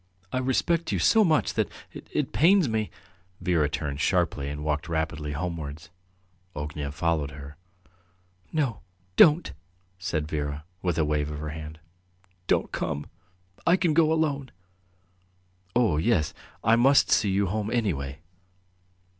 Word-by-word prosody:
"I 130 Hz, -, +1 dB
respect 160 Hz, +6 st, +1 dB
you -, -, +1 dB
so 220 Hz, -1 st, +5 dB
much 160 Hz, -6 st, +2 dB
that... -, -, 0 dB, 0.2 s
it -, -, -3 dB
pains 180 Hz, +1 st, +5 dB
me... 110 Hz, -2 st, -1 dB, 0.3 s
." 90 Hz, +1 st, -36 dB
Vera 85 Hz, -5 st, +1 dB
turned 75 Hz, -1 st, -3 dB
sharply 70 Hz, +1 st, +1 dB
and 75 Hz, +1 st, -5 dB
walked 75 Hz, 0 st, -2 dB
rapidly 80 Hz, -2 st, -2 dB
homewards. 80 Hz, -1 st, -5 dB, 0.6 s
Ognev 75 Hz, -1 st, -5 dB
followed 80 Hz, -3 st, 0 dB
her. 70 Hz, 0 st, -10 dB, 1.0 s
"No, 140 Hz, -9 st, 0 dB, 0.4 s
don't!" 155 Hz, -, +6 dB, 0.5 s
said 85 Hz, -4 st, -2 dB
Vera, 75 Hz, -1 st, -3 dB, 0.2 s
with 90 Hz, -3 st, -1 dB
a 80 Hz, -, +2 dB
wave 75 Hz, -1 st, 0 dB
of 75 Hz, -, -5 dB
her 75 Hz, +1 st, -5 dB
hand. 75 Hz, 0 st, -7 dB, 0.7 s
"Don't -, -, +1 dB
come; 75 Hz, 0 st, -3 dB, 0.6 s
I 170 Hz, -, +7 dB
can 170 Hz, -4 st, +2 dB
go 160 Hz, 0 st, +4 dB
alone." 145 Hz, -4 st, 0 dB, 1.3 s
"Oh, 115 Hz, -11 st, +3 dB
yes... 80 Hz, -2 st, +1 dB, 0.3 s
I 110 Hz, +1 st, +5 dB
must 135 Hz, +4 st, +5 dB
see 105 Hz, -, +4 dB
you 100 Hz, +1 st, +2 dB
home 105 Hz, +3 st, -2 dB
anyway." 80 Hz, -, -1 dB
85 Hz, 140 wpm, -27 LUFS, 75-125 Hz, 1.3 s, I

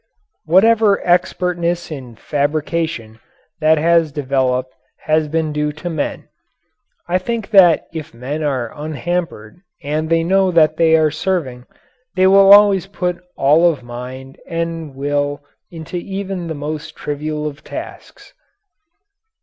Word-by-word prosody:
Whatever 205 Hz, +4 st, +4 dB
expertness 175 Hz, -1 st, 0 dB
in 130 Hz, -6 st, -8 dB
fabrication 145 Hz, -4 st, -2 dB, 0.4 s
that 155 Hz, 0 st, +4 dB
has 165 Hz, 0 st, +2 dB
developed 130 Hz, -2 st, -1 dB, 0.3 s
has 155 Hz, 0 st, +1 dB
been 160 Hz, 0 st, -1 dB
due 150 Hz, 0 st, -1 dB
to 160 Hz, +3 st, -6 dB
men. 155 Hz, -3 st, -4 dB, 0.8 s
I 180 Hz, +1 st, +1 dB
think 225 Hz, +2 st, -4 dB
that 180 Hz, -6 st, +6 dB
if 160 Hz, -3 st, -6 dB
men 130 Hz, +6 st, -5 dB
are 130 Hz, -6 st, -2 dB
unhampered 155 Hz, -5 st, -4 dB, 0.2 s
and 155 Hz, +2 st, -2 dB
they 165 Hz, 0 st, +2 dB
know 190 Hz, +2 st, +2 dB
that 155 Hz, -3 st, +3 dB
they 160 Hz, -1 st, +4 dB
are 155 Hz, -1 st, +3 dB
serving, 155 Hz, -7 st, -3 dB, 0.5 s
they 185 Hz, 0 st, +3 dB
will 195 Hz, +1 st, +6 dB
always 200 Hz, -2 st, +6 dB
put 180 Hz, -3 st, -3 dB, 0.2 s
all 155 Hz, +5 st, +4 dB
of 140 Hz, -6 st, -9 dB
mind 125 Hz, +2 st, -9 dB
and 165 Hz, -3 st, -4 dB
will 145 Hz, +1 st, -2 dB, 0.3 s
into 165 Hz, +1 st, -7 dB
even 190 Hz, -1 st, -5 dB
the 160 Hz, -, -4 dB
most 150 Hz, +1 st, -6 dB
trivial 150 Hz, +1 st, -4 dB
of 150 Hz, -1 st, -6 dB
tasks. -, -, -10 dB
160 Hz, 130 wpm, -18 LUFS, 145-175 Hz, 0.8 s, that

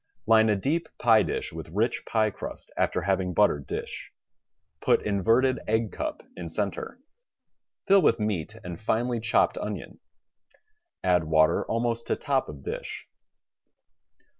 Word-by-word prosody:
Line 110 Hz, 0 st, +5 dB
a 105 Hz, -, +3 dB
deep 150 Hz, -, -1 dB
pie 115 Hz, -2 st, +5 dB
dish -, -, -3 dB
with 80 Hz, -1 st, -7 dB
rich 105 Hz, +8 st, -1 dB
pie 110 Hz, -2 st, +2 dB
crust -, -, -8 dB
after 90 Hz, -, 0 dB
having 95 Hz, -1 st, 0 dB
buttered 75 Hz, -9 st, +3 dB
dish. -, -, -5 dB, 0.7 s
Put -, -, +3 dB
inverted 115 Hz, +6 st, +2 dB
egg 110 Hz, 0 st, +1 dB
cup -, -, -4 dB
in 85 Hz, -2 st, -6 dB
center. 100 Hz, -, -3 dB, 0.9 s
FiU 195 Hz, 0 st, +6 dB
with 115 Hz, -7 st, +3 dB
meat 105 Hz, -2 st, -2 dB
and 90 Hz, 0 st, -7 dB
finely 120 Hz, +2 st, 0 dB
chopped 110 Hz, 0 st, +2 dB
onion. -, -, -6 dB, 1.0 s
Add 90 Hz, -3 st, +3 dB
water 80 Hz, 0 st, +3 dB
almost 115 Hz, 0 st, -1 dB
to -, -, +1 dB
top 135 Hz, -2 st, -1 dB
of 70 Hz, -2 st, -9 dB
dish. -, -, -6 dB
110 Hz, 140 wpm, -27 LUFS, 90-115 Hz, 1.0 s, FiU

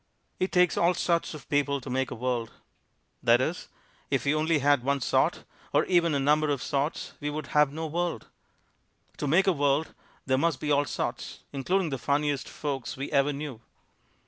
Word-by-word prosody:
"It 185 Hz, -, 0 dB
takes 180 Hz, -1 st, +3 dB
all 175 Hz, +1 st, +3 dB
sorts 170 Hz, -2 st, 0 dB
of 150 Hz, -, -11 dB
people 145 Hz, -1 st, +1 dB
to 130 Hz, -, -12 dB
make 130 Hz, +1 st, -1 dB
a -, -, -5 dB
world." 120 Hz, -1 st, -2 dB, 0.7 s
That 120 Hz, +1 st, +5 dB
is, 160 Hz, +7 st, -2 dB, 0.4 s
if 135 Hz, -2 st, 0 dB
we 140 Hz, -, +3 dB
only 155 Hz, +1 st, +2 dB
had 145 Hz, -1 st, +3 dB
one 140 Hz, +1 st, +1 dB
sort 125 Hz, -, +1 dB, 0.3 s
or -, -, +3 dB
even 170 Hz, -4 st, +3 dB
a -, -, +1 dB
number 150 Hz, +2 st, +3 dB
of 140 Hz, -3 st, -1 dB
sorts 145 Hz, +2 st, -2 dB
we 145 Hz, -, -3 dB
would 150 Hz, 0 st, -4 dB
have 150 Hz, -2 st, +4 dB
no 160 Hz, +2 st, -4 dB
world. 165 Hz, -5 st, -2 dB, 0.9 s
To 145 Hz, -, -2 dB
make 170 Hz, +7 st, +4 dB
a 190 Hz, -, +4 dB
world 145 Hz, +1 st, +1 dB, 0.3 s
there 130 Hz, -1 st, +2 dB
must 165 Hz, -3 st, +1 dB
be 150 Hz, -, -2 dB
all 145 Hz, 0 st, +3 dB
sorts, -, -, -4 dB
including 170 Hz, +5 st, 0 dB
the 135 Hz, -, -3 dB
funniest 145 Hz, +2 st, 0 dB
folks 135 Hz, -5 st, -4 dB
we 135 Hz, -, -5 dB
ever 140 Hz, +1 st, +3 dB
knew. 140 Hz, -5 st, -6 dB
145 Hz, 190 wpm, -28 LUFS, 135-160 Hz, 0.9 s, That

